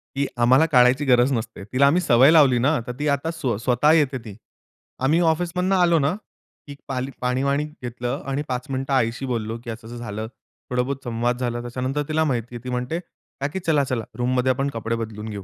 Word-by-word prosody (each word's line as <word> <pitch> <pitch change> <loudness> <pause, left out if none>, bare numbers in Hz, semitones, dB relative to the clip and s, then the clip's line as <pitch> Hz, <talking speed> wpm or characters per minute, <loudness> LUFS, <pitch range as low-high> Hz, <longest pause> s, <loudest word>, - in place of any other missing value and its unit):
की 140 +1 +1
आम्हाला 125 +6 +5
काढायची 130 -1 +4
गरज 125 0 +4
नसते. 110 -4 -4
तिला 140 +2 +5
आम्ही 165 +6 +3
सवय 130 -2 +5
लावली 140 -6 +6
ना, 140 +4 +2
तर - - -3
ती 150 - -1
आता 145 +3 0
स्वतः 125 -2 +1
येते 145 -4 +2
ती. 105 -3 -8 0.6
आम्ही 145 +6 +2
ऑफिसमधनं 180 +3 -1
आलो 175 -3 +4
ना. 145 +4 +1 0.5
की 145 - -8
पाली 130 0 -3
पाणी-वाणी 135 +3 0
घेतलं 125 -5 -5
आणि 135 +1 -1
5 125 -1 -3
मिनिटं 135 +1 -2
आईशी 120 0 0
बोललो 115 -3 -3
की 120 - -8
असं-असं 115 +1 -8
झालं, 110 -2 -5 0.4
थोडा 125 0 +1
बहुत 135 +2 -4
संवाद 120 0 -1
झाला 120 -1 -2
त्याच्यानंतर 130 +4 -3
तिला 160 +1 +2
माहिती 120 -5 -2
आहे. 120 - -8
ती 125 - -6
म्हणते, 125 +6 -2
"काकी 150 -1 -7
चला-चला 140 -7 +1
रूममध्ये 125 +1 +1
आपण 135 +2 -1
कपडे 115 0 -2
बदलून 110 -1 -6
घेऊ." 100 -2 -6
130 Hz, 190 wpm, -23 LUFS, 120-145 Hz, 0.6 s, लावली